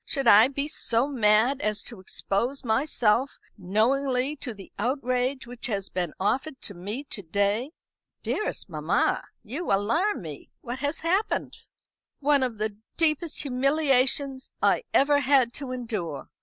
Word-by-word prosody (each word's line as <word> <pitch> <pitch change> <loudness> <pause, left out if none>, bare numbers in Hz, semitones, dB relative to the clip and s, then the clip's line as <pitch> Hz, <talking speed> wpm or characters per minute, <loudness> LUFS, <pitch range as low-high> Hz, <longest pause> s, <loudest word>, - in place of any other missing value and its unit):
Should 275 -4 -1
I 220 +1 +8
be 280 +1 -2
so 245 -4 0
mad 240 +1 +3
as 215 0 -1
to 230 -5 -7
expose 230 +8 -2
myself 240 +1 +1 0.2
knowingly 250 +8 +1
to 255 - -5
the 200 -3 -11
outrage 255 +2 0
which 245 0 -7
has 200 -4 -2
been 175 -4 -3
offered 265 +8 -1
to 200 - -5
me 205 +9 -5
to 200 - -4
day?" 205 - 0 0.5
"Dearest 425 - -2
mamma, - - 0 0.2
you 275 +10 -4
alarm 230 - +1
me. 150 -3 -9
What 245 +2 -5
has 290 +2 -2
happened?" 375 +6 -1 0.5
"One 285 -1 +3
of 250 -4 -1
the 210 -1 -2 0.2
deepest 320 0 +1
humiliations 270 0 +1
I - - +2
ever 285 +1 +4
had 265 -3 +3
to 275 -3 -5
endure. 210 - -4
250 Hz, 140 wpm, -26 LUFS, 210-280 Hz, 0.5 s, I